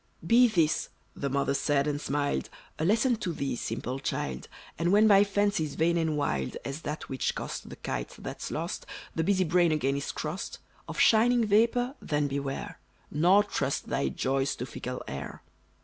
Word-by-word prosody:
"Be 245 +2 +6
this," 165 -8 +1 0.3
the 140 - -2
mother 140 0 +1
said, 140 0 +1
and 145 -1 -1
smiled, 145 0 -1 0.3
"A 155 - 0
lesson 230 +5 +3
to 210 -5 -3
thee, 140 -5 -2
simple 120 +3 -4
child! 65 - -3 0.3
And 170 +1 +2
when 210 +2 +6
by 200 -1 +7
fancies 200 -7 0
vain 170 +3 +2
and 160 -3 +1
wild, 70 - -1
As 140 +3 -4
that 150 0 -5
which 130 -2 -1
cost - - -5
the - - -8
kite - - -4
that's - - -6
lost, - - -4 0.3
The 160 - 0
busy 190 +1 +3
brain 175 0 +3
again 140 -3 +1
is 140 - -3
crossed, 155 +5 -4 0.3
Of - - -6
shining 235 +1 +5
vapor 235 +5 +3
then 145 -1 0
beware, 140 0 -4 0.3
Nor 180 +7 +5
trust 205 - -2
thy 70 - 0
joys 135 - 0
to 125 - -4
fickle 125 0 -6
air. 70 +1 -6
155 Hz, 175 wpm, -29 LUFS, 140-200 Hz, 0.3 s, by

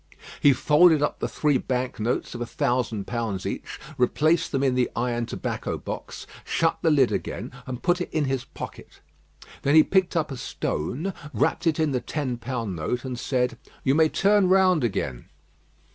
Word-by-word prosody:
He 145 - +6
folded 150 +3 +5
up 150 - -1
the - - -1
three 145 -4 +1
bank 125 -2 -2
notes 115 +3 -1
of 120 - -6
a - - -1
thousand 120 -6 -1
pounds 115 -6 -3
each, - - -5 0.2
replaced 155 +6 +2
them 135 - 0
in 135 -2 +3
the 125 -1 +1
iron 120 -1 -1
tobacco - - -3
box, - - -7 0.2
shut 165 0 0
the 165 - +3
lid 140 -5 +4
again, - - -4 0.2
and 125 -1 -6
put 175 0 +2
it - - -3
in 155 -2 +1
his 135 -2 -1
pocket. - - -10 0.6
Then 140 +2 +2
he 155 - +9
picked 190 0 +1
up 155 -2 0
a 135 - -5
stone, 125 - -3 0.2
wrapped 170 - +1
it 160 -2 +2
in 155 -2 +2
the 125 -2 0
ten 130 -3 -3
pound 115 -5 -4
note, 120 - -3
and 125 -2 -4
said: 125 -2 -1 0.2
"You 135 - +3
may 155 +1 +4
turn 200 +1 +3
round 185 -5 +4
again." 65 - -2
135 Hz, 185 wpm, -25 LUFS, 120-160 Hz, 0.6 s, he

